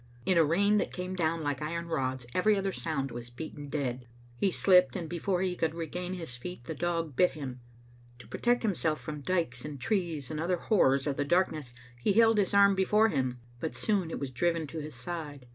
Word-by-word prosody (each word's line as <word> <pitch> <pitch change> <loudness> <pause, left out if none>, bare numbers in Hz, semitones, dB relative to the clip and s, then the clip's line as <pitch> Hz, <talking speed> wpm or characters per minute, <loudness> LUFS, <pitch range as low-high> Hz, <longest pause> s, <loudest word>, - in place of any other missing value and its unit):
In 185 - +3
a 165 - +6
rain 200 +7 +3
that - - -2
came 180 0 -4
down 165 -2 0
like 145 -2 -2
iron 170 +3 -3
rods 130 -6 -2
every 210 +3 +3
other 195 0 0
sound 140 -7 -2
was 120 0 -7
beaten 145 +3 -8
dead. 125 -4 -3 0.3
He 195 +11 +2
slipped, 180 0 +4
and 175 -4 -3
before 180 +2 -1
he 180 -1 -1
could 165 -2 -1
regain 175 +3 -4
his 165 -9 -6
feet 150 0 -7
the 145 - -5
dog 165 -2 -2
bit 180 +6 +4
him. 130 -4 -6 0.6
To 125 - -14
protect 245 0 +1
himself 165 -7 0
from 150 -1 -6
dikes 155 -7 -1
and 150 -2 -6
trees 160 - -1
and 155 - -3
other 175 +3 0
horrors 140 - +3
of 140 -2 -1
the 145 - +1
darkness 155 -4 +1 0.3
he 195 - +2
held 225 0 +5
his 195 - +1
arm 200 0 +6
before 210 +3 +3
him, 130 - -1 0.2
but 160 - -3
soon 200 -6 0
it - - -4
was 140 -2 -4
driven 165 +5 0
to 160 - -5
his 150 -2 -6
side. 145 -1 -6
165 Hz, 210 wpm, -30 LUFS, 140-185 Hz, 0.6 s, a